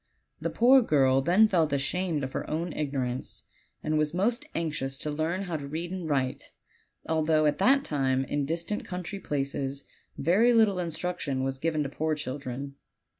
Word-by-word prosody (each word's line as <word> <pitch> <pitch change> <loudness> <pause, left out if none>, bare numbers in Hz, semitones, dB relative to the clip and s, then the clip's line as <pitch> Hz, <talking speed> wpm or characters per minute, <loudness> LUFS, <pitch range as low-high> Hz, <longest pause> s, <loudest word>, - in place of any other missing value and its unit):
The - - -2
poor 255 +3 +6
girl 135 - +3
then 185 +10 +5
felt 165 -6 +2
ashamed 150 +2 -1
of 130 - -3
her - - -4
own 165 +2 -2
ignorance, 135 -4 -3 0.4
and 155 0 +1
was 150 +2 0
most 235 +10 0
anxious 150 -5 -1
to 150 - -3
learn 160 +6 -1
how 175 -4 -3
to 140 -1 -7
read 165 +4 -4
and 180 -4 -4
write, 130 -3 -1 0.6
although 155 -1 +2
at 150 -1 +1
that 270 +7 +4
time 135 - 0
in 140 +1 -1
distant 170 +6 -2
country 180 +1 -5
places 140 -2 -2 0.3
very 205 - +4
little 215 -5 +4
instruction 165 -5 -2
was 135 0 -2
given 155 0 0
to 140 - -4
poor 155 +2 -1
children. 140 -1 -5
155 Hz, 170 wpm, -28 LUFS, 140-180 Hz, 0.6 s, poor